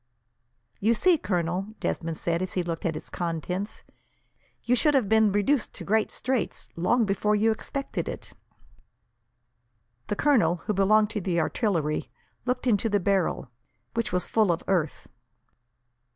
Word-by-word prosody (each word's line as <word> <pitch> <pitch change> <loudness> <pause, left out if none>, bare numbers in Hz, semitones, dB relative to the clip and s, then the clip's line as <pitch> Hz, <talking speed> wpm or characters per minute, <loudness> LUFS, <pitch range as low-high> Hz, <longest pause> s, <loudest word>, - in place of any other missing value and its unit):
"You 225 +3 +3
see, 345 +6 +4
Colonel," 180 -1 -1
Desmond 165 -1 -2
said, 170 0 -1
as 185 -1 -3
he 180 - 0
looked 170 0 -3
at 160 - -2
its - - -9
contents, 180 +4 -4 0.8
"you 245 - +3
would 300 -2 +4
have 255 -7 +3
been 220 0 +4
reduced 210 +6 +1
to - - -7
great 220 +1 +1
straits, 255 -4 -2
long 225 +8 +2
before 210 +1 +1
you 220 +2 +3
expected 275 +5 -4
it." - - -7 1.7
The - - -1
colonel, 220 - +3
who 210 - 0
belonged 210 +2 +3
to 215 -3 -3
the 175 -2 0
artillery, 160 -4 0 0.4
looked 250 0 -1
into 225 -2 +2
the 205 -1 +2
barrel, 185 - 0 0.4
which 230 -1 -1
was 180 0 0
full 215 -5 +3
of 170 - -2
earth. 175 -6 0
200 Hz, 150 wpm, -26 LUFS, 175-225 Hz, 1.7 s, see